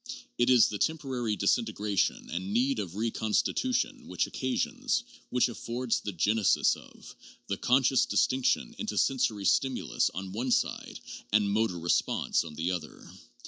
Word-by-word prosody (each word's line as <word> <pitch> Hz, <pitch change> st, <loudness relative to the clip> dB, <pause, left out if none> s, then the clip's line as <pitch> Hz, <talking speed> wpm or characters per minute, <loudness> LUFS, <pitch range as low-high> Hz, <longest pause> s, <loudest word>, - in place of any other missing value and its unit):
It 120 Hz, +1 st, +3 dB
is 125 Hz, -3 st, +6 dB
the 105 Hz, -, -5 dB
temporary 130 Hz, -9 st, -1 dB
disin 100 Hz, +4 st, +2 dB
tegration 105 Hz, -3 st, -1 dB
and 95 Hz, +3 st, -3 dB
need 125 Hz, +3 st, +1 dB
of 95 Hz, -4 st, -5 dB
reconstitution 115 Hz, -, -1 dB
which -, -, 0 dB
occasions, 245 Hz, 0 st, -1 dB, 0.3 s
which 125 Hz, 0 st, +2 dB
af 120 Hz, -, -8 dB
fords 120 Hz, 0 st, -1 dB
the 105 Hz, -, -4 dB
genesis 105 Hz, +4 st, +2 dB
of, -, -, -14 dB, 0.3 s
the 100 Hz, -, -3 dB
conscious 130 Hz, +3 st, +3 dB
distinction 130 Hz, -, +1 dB
into 220 Hz, -, -3 dB
sensory 120 Hz, -7 st, +1 dB
stim 130 Hz, +6 st, +2 dB
ulus -, -, 0 dB
on 95 Hz, 0 st, -5 dB
one 120 Hz, +6 st, -3 dB
side -, -, -1 dB, 0.3 s
and 105 Hz, -1 st, +3 dB
motor 110 Hz, -3 st, +1 dB
response 85 Hz, +1 st, +1 dB
on 80 Hz, -2 st, -9 dB
the 85 Hz, +4 st, -1 dB
other. 90 Hz, -2 st, -7 dB
115 Hz, 150 wpm, -29 LUFS, 100-130 Hz, 0.3 s, is